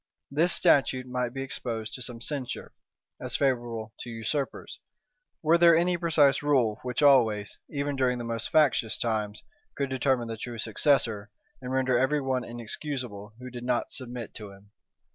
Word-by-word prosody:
This 165 +5 +3
statute 130 -5 +3
might 125 -1 -2
be 135 +1 -4
exposed 115 -4 -4
to 125 - -7
some 120 -2 -5
censure, 135 -1 -4 0.5
as - - -4
favorable 120 -5 -1
to - - -7
usurpers; 115 +5 -3 0.6
were 165 +2 +4
there 170 -1 +7
any 175 +1 +2
precise 155 -5 +3
rule, 130 -8 +2
which 125 +4 -2
always, 110 -8 +4
even 145 -1 -2
during 130 -2 +1
the 120 - -5
most 115 -1 -3
factious 145 -8 +3
times, 110 -2 -2 0.3
could 140 -1 -2
determine 130 -2 +1
the 115 -1 -5
true 120 +1 -6
successor, 110 -2 +1 0.3
and 125 - -5
render 130 -2 +2
every 140 +3 +2
one 130 -2 -1
inexcusable 120 -3 -6
who 125 0 -9
did 120 0 -7
not 125 -1 0
submit 125 -3 -5
to 105 -2 -8
him. 100 +1 -17
125 Hz, 160 wpm, -28 LUFS, 115-140 Hz, 0.6 s, there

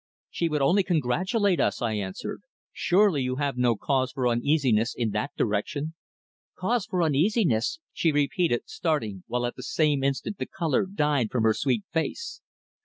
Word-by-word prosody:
"She 170 - -1
would 150 -2 0
only 180 +9 +4
congratulate 185 - +1
us," - - +1
I 115 -3 -1
answered. 95 -3 -4 0.3
"Surely 185 -5 +3
you 130 0 -1
have 140 -1 -1
no 125 -2 +2
cause 130 +2 0
for 130 -2 -1
uneasiness 120 -2 +2
in 115 -3 0
that 105 +7 -1
direction?" 140 +9 -1 0.6
"Cause 220 +4 0
for 185 -6 0
uneasiness!" 155 - +2 0.2
she 165 - +2
repeated, 145 - +1
starting, 110 - -2
while 125 0 -1
at 120 - -3
that - - -7
same 145 0 +1
instant 140 +8 -2
the - - -3
colour 165 0 0
died 150 - +1
from 120 -3 0
her 110 -1 +4
sweet 120 -3 0
face. 175 - -3
140 Hz, 165 wpm, -26 LUFS, 120-170 Hz, 0.6 s, only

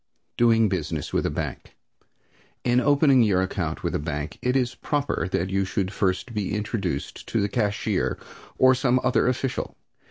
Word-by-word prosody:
DOING 115 -2 +4
BUSINESS 90 -5 -3
WITH - - +1
A - - -1
BANK - - -5 0.9
In 120 0 +3
opening 140 -1 +4
your 95 -5 +3
account 85 -4 -3
with - - -1
a - - 0
bank 75 0 -4
it 125 +1 0
is 125 -2 +1
proper 145 -6 -1
that 95 0 -1
you 95 0 +1
should 95 0 -2
first 100 +5 -1
be 105 -2 -2
introduced 100 - -3
to - - 0
the 100 - +1
cashier, 105 -1 0 0.4
or 130 0 +6
some 130 -1 +2
other 130 - +2
official. 130 +1 -2
105 Hz, 165 wpm, -25 LUFS, 95-125 Hz, 0.9 s, or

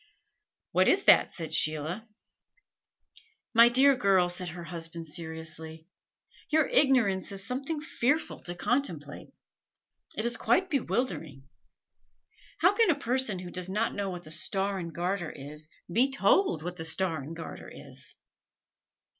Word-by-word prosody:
"What - - +3
is - - +3
that?" - - +6
said 160 -2 -6
Sheila. 155 +7 0 1.5
"My 235 0 +8
dear 270 +3 +5
girl," 190 -5 +3
said 180 0 -3
her 175 +1 -8
husband, 165 -1 -7
seriously, 160 0 -7 0.6
"your 310 -1 +3
ignorance 235 -10 +3
is 195 0 -7
something 275 +6 -3
fearful 300 0 -1
to 175 - -5
contemplate. 255 +10 -1 0.9
It 215 - -1
is 235 - +1
quite 375 0 +1
bewildering. 165 - -2 1.1
How 365 +4 +5
can 450 0 +3
a 330 - +4
person 255 -6 0
who 180 -1 -8
does 180 0 -4
not 215 +4 0
know 200 -1 -2
what 180 -1 -6
the 155 - -7
Star 195 +4 0
and 170 -2 -5
Garter 175 0 -2
is, 150 +2 -8 0.2
be 240 +10 +2
told 270 - +2
what 180 +1 -5
the 160 - -5
Star 165 -1 0
and 155 +5 -8
Garter 165 - -8
is?" - - -7
185 Hz, 140 wpm, -29 LUFS, 165-250 Hz, 1.5 s, My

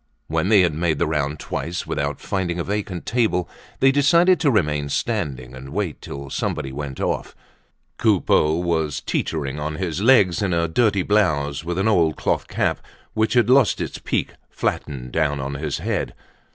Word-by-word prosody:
When 80 +4 -1
they 105 -3 +6
had 85 -4 +2
made 80 0 0
the - - +1
round 75 -1 -1
twice 85 +2 -4
without 70 0 -2
finding 90 -3 -2
a - - 0
vacant 100 -3 -3
table, 110 -7 +1 0.3
they 135 - +6
decided 170 +6 +4
to 150 - +3
remain 75 - +1
standing 65 -2 -2
and 65 +1 -9
wait 90 0 -3
till 70 0 -8
somebody 65 - -2
went 70 -1 -6
off. - - -2 0.6
Coupeau 90 -7 +3
was 80 -3 -1
teetering 75 -3 -2
on 75 +1 -3
his 90 +1 -3
legs, 105 -8 +4
in 95 -4 +1
a 85 0 +1
dirty 100 +2 +2
blouse, 75 -9 +1
with 85 +1 -3
an 95 +3 +1
old 85 -8 +3
cloth - - -1
cap - - 0 0.3
which 110 0 +1
had 120 -3 +4
lost 130 -2 +4
its - - -4
peak - - -1 0.2
flattened 65 -3 -3
down 75 -2 0
on 70 +1 -4
his 70 +1 -3
head. - - -2
85 Hz, 175 wpm, -22 LUFS, 75-105 Hz, 0.6 s, they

